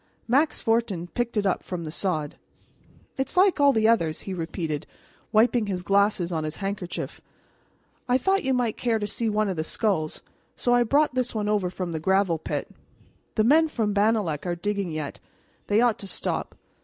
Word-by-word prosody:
Max 280 +6 +2
Fortin 225 -7 0
picked 235 +1 -2
it 205 - +1
up 190 - +1
from 180 -2 -5
the 155 - -5
sod. 160 -4 -2 0.8
"It's 265 +6 -2
like 375 -3 +5
all 285 -1 +6
the 220 -3 +3
others," 165 -9 +2
he 195 - -5
repeated, 165 -2 -4 0.4
wiping 225 0 +3
his 185 -3 -3
glasses 200 -2 +2
on 160 -2 -1
his 155 0 -3
handkerchief. 195 -3 -5 0.9
"I 250 - +5
thought 385 +9 +1
you 265 - 0
might 245 -4 0
care 235 -2 +1
to 210 - -2
see 220 +2 -1
one 215 0 +1
of 190 -3 -2
the 155 - 0
skulls, 160 -3 -1 0.3
so 245 - +1
I 245 - +5
brought 285 +5 +3
this 255 -2 -1
over 210 -3 0
from 180 -1 -4
the 160 - -3
gravel 190 -1 +2
pit. - - -4 0.6
The 215 - +3
men 310 +7 +5
from 220 -8 -1
Bannalec 205 -7 +1
are 175 - 0
digging 200 +1 -2
yet. 155 -3 -5 0.5
They 210 +2 +3
ought 240 -3 +2
to 200 - -7
stop." - - -3
205 Hz, 185 wpm, -25 LUFS, 175-235 Hz, 0.9 s, all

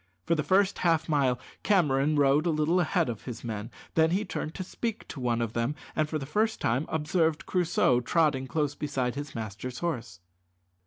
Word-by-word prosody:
For 170 - +2
the 155 - +1
first 190 +6 +2
half 165 -2 +2
mile 135 -5 +2 0.2
Cameron 150 -7 +3
rode 145 +3 +3
a - - +3
little 155 +3 +2
ahead 175 -1 +1
of 115 -4 -5
his 120 -3 -6
men, 110 -2 -4 0.2
then 160 0 +4
he 195 +5 0
turned 160 -3 -4
to 185 - -3
speak 225 +4 -4
to 140 - -7
one 120 -2 0
of 115 -1 -4
them, 120 +5 -1 0.2
and 155 -1 +1
for 155 - -1
the 140 - -5
first 215 +9 0
time 130 +7 0
observed 160 0 0
Crusoe 170 -8 +2
trotting 135 0 +1
close 145 +2 0
beside 135 -5 -2
his 145 0 -6
master's 115 +3 -5
horse. 125 - -3
150 Hz, 195 wpm, -28 LUFS, 125-170 Hz, 0.2 s, then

